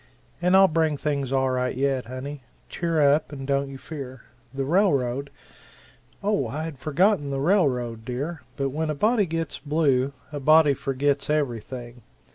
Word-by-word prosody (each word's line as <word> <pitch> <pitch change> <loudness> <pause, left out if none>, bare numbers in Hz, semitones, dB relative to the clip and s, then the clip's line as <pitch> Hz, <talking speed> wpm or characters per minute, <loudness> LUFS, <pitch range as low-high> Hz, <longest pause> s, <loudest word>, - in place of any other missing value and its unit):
And 180 +2 +4
I'll 195 0 +7
bring 160 -3 +1
things 140 -3 -2
all 135 -1 +2
right 125 0 -1
yet, 135 -2 0
honey 130 +3 -6 0.3
cheer 165 -2 -1
up 145 +2 +3
and 135 -2 -6
don't 140 0 0
you 135 - -8
fear. 130 -4 -8 0.3
The 135 0 -3
railroad 140 -6 +1 0.5
" - - -28
"Oh, 200 - +1
I 150 +7 -4
had 160 -5 -6
forgotten 155 0 +2
the 135 -1 -2
railroad, 130 - +1
dear, 140 +8 -4 0.2
but 140 -1 0
when 155 +3 -2
a 155 - -1
body 215 +4 +2
gets 165 -2 -3
blue, 140 -3 +1 0.2
a 145 - -4
body 155 +1 +5
forgets 140 +1 -1
everything. 120 -4 -3
140 Hz, 165 wpm, -25 LUFS, 130-160 Hz, 0.5 s, I'll